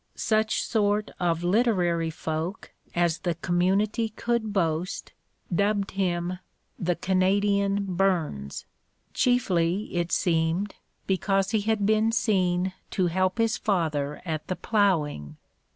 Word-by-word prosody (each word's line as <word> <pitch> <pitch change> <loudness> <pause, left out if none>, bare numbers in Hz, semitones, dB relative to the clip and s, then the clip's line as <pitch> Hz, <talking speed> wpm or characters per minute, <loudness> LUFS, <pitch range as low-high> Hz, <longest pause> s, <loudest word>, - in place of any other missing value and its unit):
Such 220 0 +1
sort 210 -1 +1
of 170 -2 0
literary 175 -5 +2
folk 160 +4 -4 0.2
as 170 -1 +1
the 175 -2 -1
community 190 +6 +1
could 225 0 -1
boast 170 -2 -1 0.4
dubbed 200 +2 +1
him 180 -2 -1 0.4
"The 175 0 0
Canadian 200 +2 +1
Burns," 175 - -1 0.5
chiefly, 195 -6 +1
it 175 0 -1
seemed, 170 +3 +1 0.3
because 195 +1 +1
he 220 -2 +2
had 215 -1 0
been 220 +1 +3
seen 185 -5 +1 0.2
to 185 - 0
help 185 +1 +1
his 225 -1 +1
father 150 -7 -1
at 155 -3 -3
the 185 - -2
ploughing. 150 - 0
185 Hz, 115 wpm, -26 LUFS, 170-205 Hz, 0.5 s, been